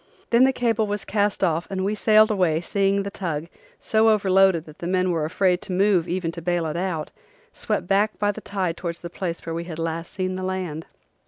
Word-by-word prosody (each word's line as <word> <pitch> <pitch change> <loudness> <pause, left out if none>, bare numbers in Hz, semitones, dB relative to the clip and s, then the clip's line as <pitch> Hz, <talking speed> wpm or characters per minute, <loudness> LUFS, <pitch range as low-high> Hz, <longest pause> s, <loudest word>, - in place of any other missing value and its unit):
Then 240 +2 +6
the 265 - +4
cable 230 -4 0
was 205 0 -3
cast 205 -1 0
off 165 -2 +1
and 190 -1 -2
we 205 - 0
sailed 215 +1 +4
away 180 -6 +2
seeing 195 +2 +1
the 200 - -5
tug, 165 -6 -3 0.3
so 220 0 +3
overloaded 195 -5 +3
that 155 -1 -14
the 170 - -4
men 185 0 +1
were 160 -3 0
afraid 180 +2 +1
to - - -7
move 185 -2 +2
even 175 -1 -1
to 170 - -8
bail 175 0 0
it 155 - -3
out, 170 -3 -2 0.4
swept - - -2
back 200 +3 +1
by 205 0 +1
the - - -9
tide 185 -4 -2
towards 170 -1 -5
the 170 - -7
place 175 -2 -4
where 165 - -4
we 170 +1 -4
had 165 -3 -7
last 165 0 -3
seen 185 -1 -3
the 185 - -5
land. 185 -4 -4
185 Hz, 225 wpm, -23 LUFS, 170-200 Hz, 0.4 s, Then